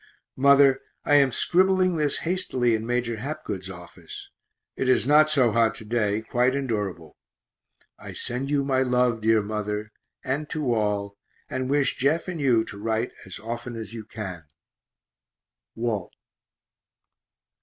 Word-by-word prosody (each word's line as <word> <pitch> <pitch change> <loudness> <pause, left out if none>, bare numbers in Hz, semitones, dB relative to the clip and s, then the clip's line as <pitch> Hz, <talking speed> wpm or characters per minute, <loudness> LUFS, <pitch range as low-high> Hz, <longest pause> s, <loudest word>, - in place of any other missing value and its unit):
Mother, 140 0 +5 0.2
I 145 - +2
am 140 -2 +4
scribbling 185 +5 +3
this 150 -2 +1
hastily 130 -9 0
in 110 0 -2
Major 120 -2 -1
Hapgood's 105 -8 -5
office; 85 -2 -10 0.4
it 130 - -1
is 130 - +3
not 150 +2 +5
so 130 -6 +4
hot 115 0 +2
to 110 - -9
day, 105 -1 0
quite 125 +3 +1
endurable. 105 - -3 0.8
I - - -9
send 125 +3 -3
you 145 -1 +1
my 135 -1 +1
love, 125 -3 +1
dear 110 -1 +3
mother, 105 0 -3 0.3
and 145 +3 -2
to 145 -6 -1
all, 100 -2 -1 0.3
and 130 0 -2
wish 145 0 +1
Jeff 150 +7 +1
and 175 -4 -4
you 120 -5 +3
to 105 -3 -9
write 115 +2 -1 0.2
as 95 - -7
often 120 +2 -6
as 110 -1 -7
you 115 -2 -6
can. 95 -6 -7 1.3
WALT. 115 -6 -2
120 Hz, 145 wpm, -25 LUFS, 105-140 Hz, 1.3 s, Mother